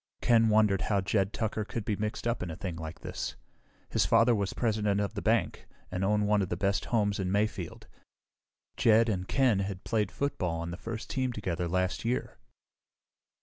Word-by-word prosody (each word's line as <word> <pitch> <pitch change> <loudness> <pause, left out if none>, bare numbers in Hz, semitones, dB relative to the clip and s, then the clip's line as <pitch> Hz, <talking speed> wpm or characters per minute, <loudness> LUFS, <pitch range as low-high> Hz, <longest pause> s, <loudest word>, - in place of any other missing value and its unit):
Ken 115 -2 +4
wondered 105 -3 +4
how 100 -2 +3
Jed 95 +1 +1
Tucker 110 -1 -2
could 110 0 -5
be 105 - 0
mixed 105 +2 -3
up 120 - -1
in 90 - -3
a 80 - -5
thing 90 -1 -5
like 80 0 -7
this. - - -4 0.6
His - - +3
father 120 +1 +4
was 100 -3 0
president 105 -3 0
of 100 0 -1
the 100 - -4
bank 110 0 0 0.2
and 90 +1 -2
owned 105 +1 +2
one 105 0 +3
of 95 - -2
the 85 - -2
best 100 +1 0
homes 105 -4 +1
in 95 -1 -1
Mayfield. 100 -3 -1 0.9
Jed 115 +1 +5
and 95 -3 -2
Ken 130 -7 +3
had 95 -1 -4
played 105 -4 0
football 90 -12 -2
on 85 +1 -4
the - - -4
first 115 +4 -6
team 130 -1 -1
together 90 -6 -2
last 95 +1 -1
year. 120 +2 -2
105 Hz, 190 wpm, -30 LUFS, 95-110 Hz, 0.9 s, Jed